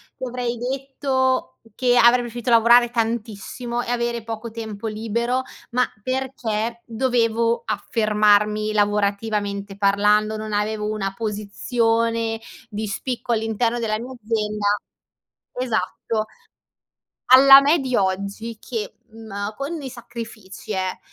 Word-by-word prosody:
ti -, -, -10 dB
avrei 245 Hz, -1 st, -3 dB
detto 260 Hz, -, -1 dB, 0.2 s
che 245 Hz, -1 st, +3 dB
avrei 245 Hz, +1 st, +6 dB
preferito 240 Hz, 0 st, -5 dB
lavorare 235 Hz, +1 st, +6 dB
tantissimo 235 Hz, +1 st, -2 dB
e -, -, -6 dB
avere 235 Hz, -1 st, -1 dB
poco 225 Hz, 0 st, -6 dB
tempo 220 Hz, -1 st, -7 dB
libero, 230 Hz, +4 st, -1 dB, 0.3 s
ma 250 Hz, +1 st, +3 dB, 0.2 s
perché 235 Hz, -3 st, -2 dB
dovevo 230 Hz, -1 st, +1 dB
affermarmi 215 Hz, 0 st, +2 dB
lavorativamente 205 Hz, -1 st, 0 dB
parlando, 210 Hz, +2 st, +3 dB
non 215 Hz, 0 st, -5 dB
avevo 210 Hz, +1 st, -1 dB
una 195 Hz, -2 st, -2 dB
posizione 225 Hz, +2 st, 0 dB, 0.3 s
di 215 Hz, +1 st, -4 dB
spicco 245 Hz, +4 st, -3 dB
all'interno 225 Hz, +2 st, 0 dB
della 215 Hz, -2 st, -1 dB
mia 250 Hz, +2 st, -7 dB
azienda 210 Hz, -1 st, -2 dB, 0.9 s
esatto. 225 Hz, -2 st, -1 dB, 1.1 s
Alla 270 Hz, +1 st, +10 dB
me 290 Hz, +4 st, +3 dB
di 260 Hz, -2 st, -3 dB
oggi 200 Hz, +4 st, -2 dB
che, 225 Hz, -4 st, -5 dB
mhmm, 215 Hz, -2 st, -6 dB
con 290 Hz, +5 st, -4 dB
dei 280 Hz, -3 st, -6 dB
sacrifici, 225 Hz, -4 st, -8 dB
eh, 185 Hz, -1 st, -2 dB
225 Hz, 115 wpm, -22 LUFS, 210-240 Hz, 1.1 s, Alla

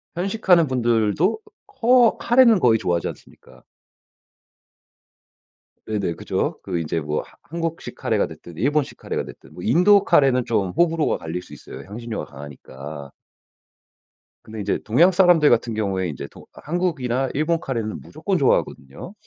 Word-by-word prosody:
편식하는 180 Hz, -2 st, +2 dB
분들도 120 Hz, -, +1 dB, 0.3 s
커 240 Hz, 0 st, +3 dB
카레는 240 Hz, -4 st, +5 dB
거의 120 Hz, -7 st, +4 dB
좋아하지 85 Hz, -3 st, -1 dB
않습니까? -, -, -15 dB, 2.2 s
네네. 100 Hz, -5 st, -2 dB
그죠. -, -, -3 dB
그 85 Hz, -, -3 dB
이제 80 Hz, 0 st, -2 dB
뭐 75 Hz, 0 st, -2 dB
하 -, -, -17 dB
한국식 165 Hz, 0 st, -5 dB
카레가 -, -, 0 dB
됐든 85 Hz, -, -12 dB
일본식 145 Hz, -, 0 dB
카레가 -, -, -4 dB
됐든. 65 Hz, +3 st, -14 dB
뭐 90 Hz, -, -10 dB
인도 180 Hz, -, +5 dB
카레는 135 Hz, -7 st, +3 dB
좀 100 Hz, -5 st, 0 dB
호불호가 165 Hz, -, +1 dB
갈릴 80 Hz, +2 st, -5 dB
수 -, -, -15 dB
있어요 -, -, -11 dB
향신료가 115 Hz, +2 st, -6 dB
강하니까. 70 Hz, 0 st, -10 dB, 1.3 s
근데 110 Hz, -1 st, -9 dB
이제 100 Hz, 0 st, -1 dB
동양 150 Hz, -, +4 dB
사람들 175 Hz, -5 st, +5 dB
같은 120 Hz, -1 st, +1 dB
경우에 95 Hz, -4 st, -2 dB
이제 70 Hz, -, -7 dB
도 -, -, -16 dB
한국이나 140 Hz, -7 st, -2 dB
일본 160 Hz, +3 st, 0 dB
카레는 115 Hz, -, -4 dB
무조건 -, -, -3 dB
좋아하거든요. 70 Hz, -, -1 dB
120 Hz, 330 characters per minute, -22 LUFS, -, 2.2 s, 카레는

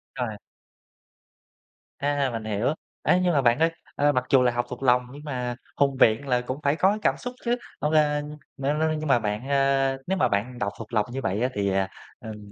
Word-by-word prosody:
Rồi. 125 Hz, -3 st, -2 dB, 1.7 s
À, 140 Hz, -1 st, 0 dB
mình 115 Hz, -1 st, -4 dB
hiểu. 110 Hz, +6 st, 0 dB, 0.3 s
Ấy, 180 Hz, -, +3 dB
nhưng 175 Hz, -2 st, +2 dB
mà 140 Hz, -, +3 dB
bạn 120 Hz, +3 st, +3 dB
ơi, 165 Hz, +1 st, +3 dB, 0.2 s
ơ, 145 Hz, +1 st, +3 dB
mặc 125 Hz, -2 st, 0 dB
dù 135 Hz, -2 st, +5 dB
là 125 Hz, -1 st, +3 dB
học 120 Hz, 0 st, -1 dB
thuộc 125 Hz, +2 st, -7 dB
lòng 125 Hz, -1 st, +4 dB
nhưng 145 Hz, +2 st, -11 dB
mà 125 Hz, -4 st, -3 dB, 0.2 s
hùng 140 Hz, -2 st, +2 dB
biện 115 Hz, +5 st, +4 dB
là 125 Hz, -1 st, +2 dB
cũng 130 Hz, +3 st, -5 dB
phải 140 Hz, +1 st, +2 dB
có 195 Hz, +5 st, +3 dB
cảm -, -, +2 dB
xúc 245 Hz, 0 st, -6 dB
chứ? 240 Hz, +1 st, +2 dB, 0.3 s
Hông 150 Hz, -, +1 dB
lên 150 Hz, -1 st, +1 dB, 0.2 s
le 140 Hz, +2 st, 0 dB
le 155 Hz, +1 st, +1 dB
nhưng 155 Hz, 0 st, -4 dB
mà 120 Hz, -, +4 dB
bạn 105 Hz, +5 st, -3 dB
a, 135 Hz, -1 st, +2 dB
nếu 190 Hz, 0 st, 0 dB
mà -, -, +3 dB
bạn 115 Hz, +5 st, -1 dB
đọc 100 Hz, -2 st, -2 dB
thuộc 115 Hz, +1 st, -10 dB
lòng 105 Hz, -2 st, +2 dB
như 135 Hz, -, -3 dB
vậy 95 Hz, +4 st, -1 dB
á, 125 Hz, -, +2 dB
thì, 100 Hz, -1 st, 0 dB, 0.5 s
ừm, 105 Hz, -2 st, -9 dB
135 Hz, 220 wpm, -25 LUFS, 120-145 Hz, 1.7 s, dù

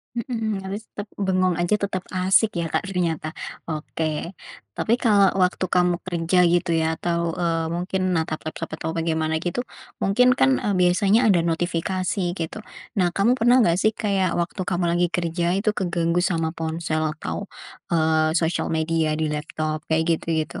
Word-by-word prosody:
Mhm, 225 Hz, -4 st, -2 dB
realis 195 Hz, +3 st, -6 dB
tep 205 Hz, 0 st, -7 dB
bengong 185 Hz, -3 st, +1 dB
aja 175 Hz, +4 st, +1 dB
tetap 195 Hz, -2 st, -2 dB
asik 185 Hz, +1 st, +2 dB
ya, 165 Hz, -, -2 dB
Kak, -, -, -1 dB
ternyata? 170 Hz, -4 st, -2 dB, 0.3 s
Oke, 155 Hz, +2 st, -4 dB, 0.4 s
tapi 235 Hz, +3 st, +1 dB
kalau 205 Hz, -5 st, +4 dB
waktu 180 Hz, +1 st, +2 dB
kamu 180 Hz, -1 st, +3 dB
kerja 175 Hz, 0 st, 0 dB
gitu 175 Hz, +1 st, +2 dB
ya 160 Hz, 0 st, 0 dB
atau, 170 Hz, -1 st, 0 dB
eee, 165 Hz, -2 st, -1 dB
mungkin 185 Hz, +1 st, -1 dB
natap 160 Hz, -2 st, -2 dB
laptop 155 Hz, -, -5 dB
atau 160 Hz, 0 st, -4 dB
bagaimana 160 Hz, -1 st, -1 dB
gitu 180 Hz, +9 st, -2 dB, 0.4 s
mungkin 245 Hz, +6 st, +4 dB
kan, 130 Hz, -1 st, +3 dB
eee, 205 Hz, -, 0 dB
biasanya 195 Hz, +6 st, +3 dB
ada 175 Hz, -, +3 dB
notifikasi 175 Hz, +3 st, -1 dB, 0.2 s
gitu. 165 Hz, +6 st, -4 dB, 0.4 s
Nah, 180 Hz, -, +3 dB
kamu 230 Hz, +5 st, +4 dB
pernah 240 Hz, +2 st, +5 dB
gak 170 Hz, +2 st, +2 dB
sih 220 Hz, -, +3 dB
kayak 195 Hz, -4 st, 0 dB
waktu 175 Hz, +3 st, -2 dB
kamu 175 Hz, -1 st, 0 dB
lagi 175 Hz, 0 st, +2 dB
kerja 170 Hz, +1 st, -1 dB
itu 210 Hz, +2 st, +1 dB
keganggu 175 Hz, -3 st, 0 dB
sama 165 Hz, -3 st, 0 dB
ponsel 160 Hz, -1 st, -2 dB, 0.2 s
atau, 200 Hz, +5 st, -5 dB, 0.4 s
eee, 160 Hz, -1 st, +2 dB
sosial 165 Hz, 0 st, 0 dB
media 160 Hz, -1 st, 0 dB
di 155 Hz, -1 st, -1 dB
laptop 155 Hz, +1 st, -3 dB
kayak 160 Hz, 0 st, +2 dB, 0.2 s
gitu-gitu? 160 Hz, -2 st, -2 dB
175 Hz, 160 wpm, -23 LUFS, 160-190 Hz, 0.4 s, pernah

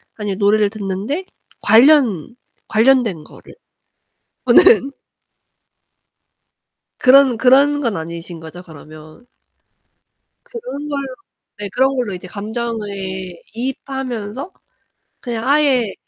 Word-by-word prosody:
아니면 205 Hz, -3 st, -4 dB
노래를 210 Hz, 0 st, +3 dB
듣는데 210 Hz, -, -4 dB, 0.4 s
관련 240 Hz, -, +4 dB, 0.3 s
관련된 225 Hz, -7 st, +2 dB
거를 -, -, -16 dB, 0.9 s
보는 280 Hz, -, +5 dB, 2.1 s
그런, 260 Hz, -2 st, +5 dB
그런 280 Hz, +4 st, +4 dB
건 235 Hz, -7 st, -1 dB
아니신 165 Hz, +1 st, -7 dB
거죠 160 Hz, +2 st, -10 dB
그러면? 155 Hz, +3 st, -14 dB, 1.2 s
그런 470 Hz, -, -7 dB
걸 280 Hz, -1 st, -2 dB, 0.6 s
네. 205 Hz, -1 st, -5 dB
그런 265 Hz, +5 st, +1 dB
걸로 245 Hz, -6 st, -2 dB
이제 180 Hz, 0 st, -8 dB
감정을 220 Hz, +2 st, -5 dB, 0.6 s
이입하면서 255 Hz, -, -5 dB, 0.7 s
그냥 235 Hz, -1 st, -5 dB
아예 275 Hz, -7 st, +2 dB
235 Hz, 200 characters per minute, -18 LUFS, 200-270 Hz, 2.1 s, 보는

